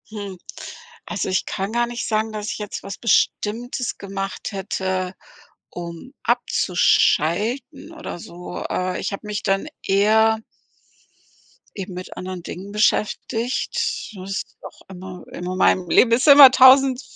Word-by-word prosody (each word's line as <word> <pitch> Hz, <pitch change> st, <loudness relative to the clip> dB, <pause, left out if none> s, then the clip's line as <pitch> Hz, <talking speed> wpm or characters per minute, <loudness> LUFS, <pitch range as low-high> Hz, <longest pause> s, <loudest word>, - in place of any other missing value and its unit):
Hm, 200 Hz, -3 st, -7 dB, 0.7 s
also -, -, -3 dB
ich 185 Hz, -, 0 dB
kann 195 Hz, +2 st, -3 dB
gar 240 Hz, 0 st, +1 dB
nicht 240 Hz, 0 st, -5 dB
sagen, 220 Hz, 0 st, 0 dB
dass 210 Hz, 0 st, -4 dB
ich -, -, -5 dB
jetzt 210 Hz, -1 st, -6 dB
was 195 Hz, 0 st, -7 dB
Bestimmtes 240 Hz, +2 st, 0 dB
gemacht 195 Hz, +1 st, -5 dB
hätte, 190 Hz, -1 st, -3 dB, 0.5 s
um 170 Hz, -, -8 dB
abzuschalten 235 Hz, -, +1 dB
oder 310 Hz, -, -7 dB
so. 175 Hz, +1 st, -8 dB
Äh, 185 Hz, 0 st, -2 dB
ich -, -, -3 dB
habe 205 Hz, +2 st, -7 dB
mich 210 Hz, 0 st, -4 dB
dann 195 Hz, +5 st, 0 dB, 0.2 s
eher 220 Hz, +3 st, +3 dB, 1.3 s
eben 195 Hz, -1 st, -6 dB
mit 180 Hz, +1 st, -8 dB
anderen 185 Hz, -1 st, -6 dB
Dingen 190 Hz, +4 st, -8 dB
beschäftigt. 225 Hz, +3 st, -1 dB
Ist 195 Hz, 0 st, -5 dB
auch -, -, -12 dB
immer 185 Hz, -1 st, -9 dB
in 175 Hz, -, -7 dB
meinem 185 Hz, 0 st, +1 dB
Leben 240 Hz, -, +5 dB
ist 245 Hz, +5 st, +3 dB
immer 280 Hz, -2 st, +10 dB
1.000- 260 Hz, 0 st, +6 dB
205 Hz, 135 wpm, -21 LUFS, 185-235 Hz, 1.3 s, immer